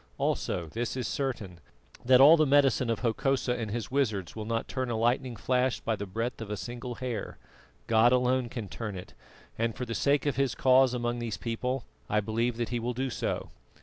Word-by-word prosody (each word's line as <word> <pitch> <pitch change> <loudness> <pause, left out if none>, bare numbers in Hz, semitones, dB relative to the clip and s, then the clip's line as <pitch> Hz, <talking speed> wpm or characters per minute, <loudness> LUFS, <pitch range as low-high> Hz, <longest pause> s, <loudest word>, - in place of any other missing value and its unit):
Also 85 - -1
this 115 +9 -4
is 125 - -2
certain, 110 -11 -3 0.4
that 125 +1 +6
all 145 +5 +9
the 155 -2 +3
medicine 135 -3 +3
of 115 - -1
Hokosa 125 +2 +1
and 115 -3 -3
his 115 +2 -4
wizards 110 - -1
will 110 -1 -5
not 115 +1 -2
turn 130 -2 -3
a 120 - -1
lightning 120 +2 +1
flash 125 +3 0
by 110 - -1
the 100 -1 -6
breadth 115 +5 -3
of 110 - -6
a 105 - -3
single 120 +3 -6
hair. 125 -4 -4 0.5
God 115 +1 +4
alone 125 -1 +2
can 115 -4 -5
turn 105 0 -5
it, 90 - -9 0.5
and 115 -1 0
for 125 - -4
the 115 - -4
sake 140 +3 +2
of 145 -3 0
His 135 -3 +1
cause 130 -1 +4
among 120 0 -2
these 115 -3 -3
people 125 +2 -3 0.2
I 105 - +2
believe 115 +3 -1
that 120 -1 -2
He 120 - -1
will 120 +1 -3
do 130 +1 -2
so." - - -3
120 Hz, 210 wpm, -29 LUFS, 115-130 Hz, 0.5 s, all